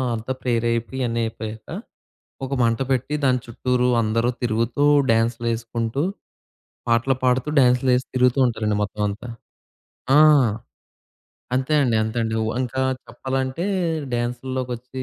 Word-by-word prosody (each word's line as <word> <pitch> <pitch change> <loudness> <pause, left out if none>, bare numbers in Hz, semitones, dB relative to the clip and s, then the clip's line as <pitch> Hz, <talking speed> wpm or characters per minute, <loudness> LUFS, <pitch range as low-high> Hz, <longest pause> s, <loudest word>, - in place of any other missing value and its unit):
అంతా 115 +4 -5
ప్రేయర్ 120 -2 0
అయిపోయి 115 +3 -3
ఇయన్నీ 115 -1 0
అయిపోయాక, 110 -1 -7 0.8
ఒక 135 - -6
మంట 115 0 +1
పెట్టి 130 +3 0
దాని 125 -2 +3
చుట్టూరు 125 +1 0
అందరూ 115 +2 +1
తిరుగుతూ, 115 +4 0 0.3
డ్యాన్స్‌లేసుకుంటూ 115 +2 0 0.9
పాటలు 115 +3 +2
పాడుతూ 125 +3 +2
డ్యాన్సులేసి 125 0 +3
తిరుగుతూ 125 +1 +3
ఉంటారండి 110 -3 0
మొత్తం 105 +1 -5
అంతా. 105 +5 -6 0.9
ఆ! - - +8 1.4
అంతే 130 +4 0
అండి. 120 -4 +2
అంతే 110 +2 -4
అండి. 110 -1 -2
ఉ - - -1
ఇంకా 130 +1 -3 0.3
చెప్పాలంటే, 130 +4 -3 0.5
డ్యాన్సుల్లోకొచ్చి 125 +1 -4
120 Hz, 115 wpm, -22 LUFS, 115-130 Hz, 1.4 s, ఆ